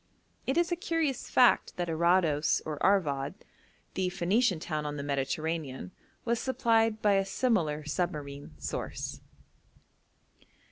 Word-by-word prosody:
It 265 - +1
is 345 +1 +2
a - - +2
curious 330 - -1
fact 245 - +4
that 175 -1 -1
Arados 165 -2 +2
or 150 -2 -5
Arvad, 145 -9 +2 0.6
the 185 -1 0
Phoenician 190 +2 +1
town 155 -2 -3
on 150 0 -4
the 140 - -4
Mediterranean, 140 - -2 0.3
was 235 -1 +1
supplied 225 -4 +1
by 205 -2 +4
a 195 - +2
similar 180 - 0
submarine 145 - -4
source. 70 - -5
175 Hz, 125 wpm, -30 LUFS, 150-225 Hz, 0.6 s, fact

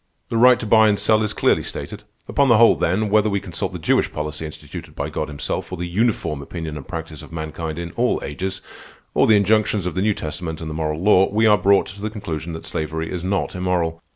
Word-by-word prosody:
The 115 - -1
right 125 +1 +6
to - - -4
buy 110 0 +5
and 105 - +2
sell 110 +1 +3
is 105 - 0
clearly - - +2
stated. - - -7 0.3
Upon 140 - +2
the 120 - +6
whole, 115 +1 +6
then, 100 +4 0
whether 110 0 +4
we 100 -1 0
consult 90 -4 -4
the - - -5
Jewish - - +1
policy 75 +1 -4
instituted 75 - -10
by - - -4
God - - -3
himself, 70 +4 -4
or 90 - -4
the 90 - -3
uniform 90 -5 0
opinion 80 +1 -6
and 75 - -8
practice 80 -2 -6
of - - -13
mankind 80 0 -5
in 85 0 -5
all 120 +6 +1
ages, 95 +7 -4 0.5
or - - +3
the 110 - +6
injunctions 105 -1 +2
of 90 - -2
the 95 - -1
New 105 0 +2
Testament 80 +1 -5
and 80 -1 -5
the - - -4
moral 75 0 -2
law, 95 -2 +5
we 110 +2 +2
are 105 -1 +7
brought 100 +1 +3
to 100 +1 -9
the 110 - -2
conclusion 85 -6 -5
that 80 - -7
slavery 80 +1 -3
is 90 -2 -4
not 95 +1 -1
immoral. 90 -3 -1
90 Hz, 235 wpm, -21 LUFS, 80-105 Hz, 0.5 s, are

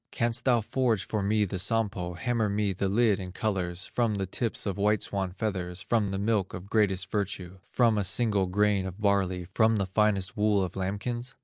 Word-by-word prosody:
Canst 115 -1 -1
thou 120 -3 +4
forge 115 -3 0
for 105 - -2
me 105 +2 +2
the 95 -1 -4
Sampo, 100 -4 0
Hammer 115 +3 0
me 100 -1 0
the 95 +1 -1
lid 105 0 +3
in 90 -1 -6
colors, 90 -3 -2
From 115 -3 0
the 100 -1 -2
tips 115 +5 -1
of 100 -1 -3
white 105 +1 +2
swan 95 -2 -2
feathers 90 -3 -3
From 105 +1 0
the 95 - -2
milk 100 -1 0
of 95 +3 -9
greatest 100 -3 +1
virtue, 95 -3 -3
From 115 +1 +2
a - - 0
single 100 -1 +2
grain 100 0 +1
of 95 +2 -8
barley, 95 -3 +1
From 110 +1 +3
the 100 -2 0
finest 95 0 +1
wool 105 -2 +2
of 90 - -5
lambkins? 105 +6 -3
100 Hz, 200 wpm, -28 LUFS, 95-110 Hz, -, thou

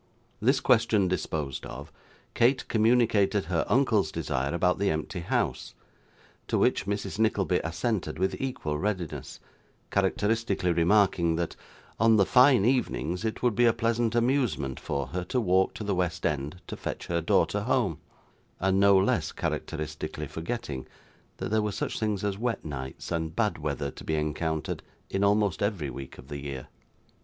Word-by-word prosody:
This 130 +5 +3
question 110 -6 +3
disposed 75 -6 -2
of, - - -8 0.4
Kate 125 +3 +2
communicated 110 -4 +3
her 85 -1 0
uncle's 120 -6 +3
desire 65 +2 -2
about 90 +2 +1
the 100 0 +2
empty 80 +4 -2
house, 85 - -2 0.7
to - - +1
which - - +2
Mrs. 100 0 -3
Nickleby 100 -5 +2
assented 85 -1 -2
with 95 +2 0
equal 80 - -2
readiness, 95 -4 -3 0.5
characteristically 100 -1 +1
remarking, 85 -1 +3
that, 85 0 -2 0.4
on 110 +1 +5
the 100 -2 +5
fine 125 -2 +6
evenings, 110 - 0
it 110 +1 -3
would 120 -2 +3
be 120 +3 +3
a 115 - +5
pleasant 115 0 0
amusement 120 - +1
for 70 -1 -2
her 90 +1 -3
to 125 - 0
walk 95 -3 +2
to 110 - -5
the 100 -1 0
West 90 -2 -1
end 75 +4 -2
to - - -6
fetch - - -5
her 85 -1 -1
daughter 105 +5 +2
home; 105 - 0 0.6
and 95 +1 +2
no 100 0 +6
less 95 - +1
characteristically 75 -1 -4
forgetting, 80 - -5 0.5
that - - -4
there 110 0 +3
were 105 0 -1
such - - -3
things 105 -3 -1
as 100 -1 -1
wet 120 -5 -2
nights 65 -3 -6
and 80 -1 -2
bad 105 -3 0
weather 70 -2 -2
to - - -11
be 80 - -1
encountered 75 0 -2 0.3
in 95 - 0
almost 100 -1 +2
every 95 -9 -1
week 70 -1 -8
of 65 - -13
the 70 0 -6
year. 70 -2 -6
95 Hz, 160 wpm, -28 LUFS, 80-110 Hz, 0.7 s, fine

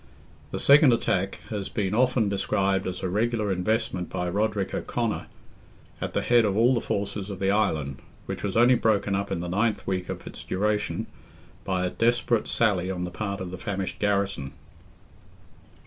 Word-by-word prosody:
The - - -4
second 140 -2 +6
attack 95 -4 0
has 100 -3 -3
been 100 -1 -1
often 125 -1 +3
described 95 -1 0
as 90 0 -5
a - - +1
regular 105 +2 0
investment 95 -1 -1
by 90 0 -2
Roderick 105 +1 -1
O'Conor, 115 -3 -2 0.7
at - - -3
the - - +1
head 120 -1 +5
of 100 -2 0
all 120 +3 +5
the 120 - 0
forces 100 0 -3
of 100 - -5
the 95 +1 +1
Island, 75 -10 0 0.3
which - - -5
was 100 +1 -2
only 120 +2 +6
broken 105 -4 +2
up 100 +1 -1
in 90 -3 -1
the 90 - -4
ninth 100 +2 0
week 90 -1 -2
of - - -5
its - - -9
duration, 105 +2 -1 0.6
by 95 -1 0
a 90 - -1
desperate 120 -1 +1
sally 95 -6 +1
on 90 -2 -3
the 90 - -4
part 100 +1 -4
of 90 -1 -5
the 95 - -7
famished 95 -2 -3
garrison. 100 -9 0
100 Hz, 180 wpm, -26 LUFS, 95-110 Hz, 0.7 s, second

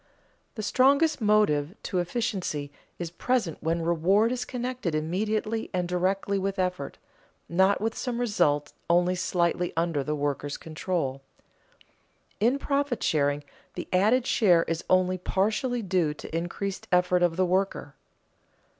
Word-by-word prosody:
_ - - -44
The 215 - -4
strongest 280 +6 +3
motive 205 -7 +2
to 185 - -1
efficiency 180 -7 -2 0.3
is 170 -2 -5
present 220 -2 -1
when 165 +1 0
reward 185 +7 +3
is 250 0 -2
connected 245 - -3
immediately 215 +7 -1
and 180 -1 0
directly 190 +2 0
with 195 +1 -2
effort, 180 -6 -2 0.5
not 190 +3 +3
with 225 +1 -2
some 245 -2 -3
result 150 -11 +1 0.2
only 175 +1 +3
slightly 180 -1 0
under 165 -4 0
the 150 +2 -2
worker's 145 0 -2
control. 155 -4 -3 1.2
In 240 +6 +3
profit 280 -3 -1
sharing 145 -2 +1 0.3
the - - -5
added 220 +7 +3
share 180 -10 +4
is 165 0 -3
only 185 0 +3
partially 220 +7 0
due 175 -6 +1
to 160 - -8
increased 175 +3 -3
effort 180 0 +3
of 175 -2 +2
the 185 - +3
worker. 190 +2 -1
185 Hz, 135 wpm, -27 LUFS, 165-215 Hz, 1.2 s, share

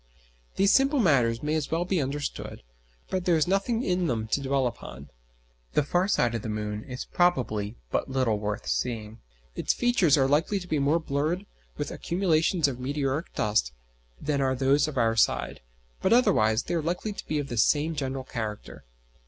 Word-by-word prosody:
These 195 0 +4
simple 275 +2 +4
matters 125 - +2
may 150 +1 0
as 155 -2 -1
well 165 +2 0
be 180 -3 0
understood, 140 - -4 0.5
but 185 -1 -1
there 175 - +4
is 155 0 +2
nothing 200 +5 0
in 180 -4 0
them 115 -5 -1
to 140 - 0
dwell 135 -1 +1
upon. 70 - -7 0.6
The 150 - +3
far 175 +6 +1
side 160 - +2
of 115 - -2
the 110 - -5
moon 105 0 -3
is 125 -1 -6
probably 120 - 0 0.2
but - - -1
little 130 -5 +1
worth 105 0 -3
seeing. 115 -2 -3 0.3
Its - - 0
features 195 - +3
are 135 -1 +3
likely 160 +8 +1
to 180 - -10
be 155 -4 0
more 140 +4 +3
blurred 160 +4 -2 0.3
with - - -3
accumulations 170 -2 +1
of 130 -3 -4
meteoric 140 +3 -2
dust 105 - +1 0.5
than 145 -1 -1
are 130 -1 +1
those 135 +3 +3
of 150 -3 -6
our 115 -2 +2
side, 115 - +1 0.4
but 190 - +1
otherwise 120 - +3
they - - -4
are 170 - +1
likely 180 +6 -2
to - - -9
be 155 - -1
of 145 -1 -3
the 120 - -4
same 150 +7 +3
general 135 -3 -3
character. 110 -4 -6
140 Hz, 185 wpm, -27 LUFS, 120-175 Hz, 0.6 s, These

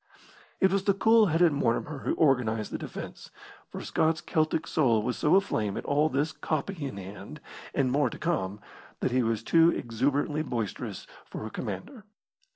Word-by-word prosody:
It 190 -1 +4
was 195 0 0
the 200 - +3
cool 220 +2 +5
headed 165 -1 +3
Mortimer 140 +2 -1
who - - -1
organised 120 -7 +2
the - - -3
defence, - - -8 0.4
for - - -7
Scott's 160 0 +1
Celtic 155 0 0
soul 120 -9 +2
was 125 +2 -1
so 155 +4 +3
aflame 110 - +1
at - - -5
all 150 +2 +2
this 145 +3 0
"copy" 155 0 -3
in 115 - -7
hand 100 +9 -9 0.4
and 130 -2 +2
more 140 -1 +2
to - - -8
come 105 - -2 0.4
that - - 0
he 130 +1 +2
was 115 -2 -1
too 165 +5 +5
exuberantly 140 +4 0
boisterous 115 - -4 0.2
for - - -7
a 110 - -6
commander. 260 -6 -6
145 Hz, 170 wpm, -28 LUFS, 115-165 Hz, 0.4 s, cool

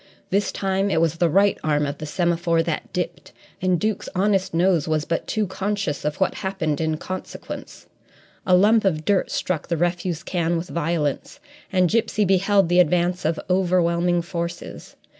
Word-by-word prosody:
This 200 +2 +1
time 195 0 0
it 160 - +2
was 165 0 +1
the 170 0 +2
right 195 +5 +3
arm 150 -1 +1
of 140 0 -5
the 155 - -5
semaphore 170 0 +1
that - - -3
dipped - - -4 0.3
and 185 -2 +2
Duke's 215 0 -2
honest 195 0 +1
nose 170 -2 +2
was 155 -1 0
but 165 - -2
too 215 -1 0
conscious 195 -4 -3
of 150 0 -1
what 190 - +2
happened 165 -6 -2
in 160 -1 0
consequence. 185 +3 -7 0.6
A 185 - +4
lump 210 +4 +5
of 155 -6 0
dirt 200 -2 +2
struck 180 -5 -2
the 170 - -1
refuse 175 0 -1
can 170 -1 0
with 170 +2 -5
violence, 165 - -2 0.3
and 185 -2 +3
Gipsy 215 +1 +1
beheld 195 0 +3
the 175 +1 +3
advance 180 +1 +2
of 160 +1 0
overwhelming 175 -1 +2
forces. 170 -1 -6
175 Hz, 170 wpm, -23 LUFS, 165-190 Hz, 0.6 s, lump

